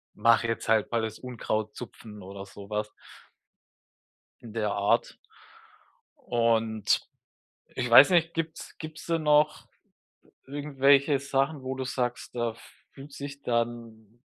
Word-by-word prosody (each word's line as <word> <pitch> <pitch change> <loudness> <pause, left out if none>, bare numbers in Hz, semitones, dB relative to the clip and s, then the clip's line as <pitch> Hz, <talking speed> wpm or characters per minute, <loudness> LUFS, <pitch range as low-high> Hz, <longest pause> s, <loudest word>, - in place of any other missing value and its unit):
mache 115 0 +4
jetzt 115 0 -3
halt 110 0 +2
mal 115 -1 +1
das 110 -1 -5
Unkraut 110 -4 -3
zupfen“ 110 -3 -10
oder 100 +1 -8
so 100 +1 -12
was 105 0 -2 1.5
in 115 -2 -11
der 105 -2 -1
Art. 100 0 +1 1.1
Und, 115 -2 +1 0.7
ich 125 -1 -2
weiß 135 +8 +9
nicht, 170 -1 +3
gibt's 165 -1 -5
gibt's 155 -1 -9
denn 165 -2 -1
noch 150 0 +3 0.8
irgendwelche 140 0 +3
Sachen, 140 +1 -1
wo 130 0 -3
du 130 - -3
sagst, 125 -2 -3
da 120 -2 -1 0.4
fühlt 140 +1 -12
sich 140 0 -8
dann 115 -1 -3
120 Hz, 125 wpm, -28 LUFS, 110-140 Hz, 1.5 s, weiß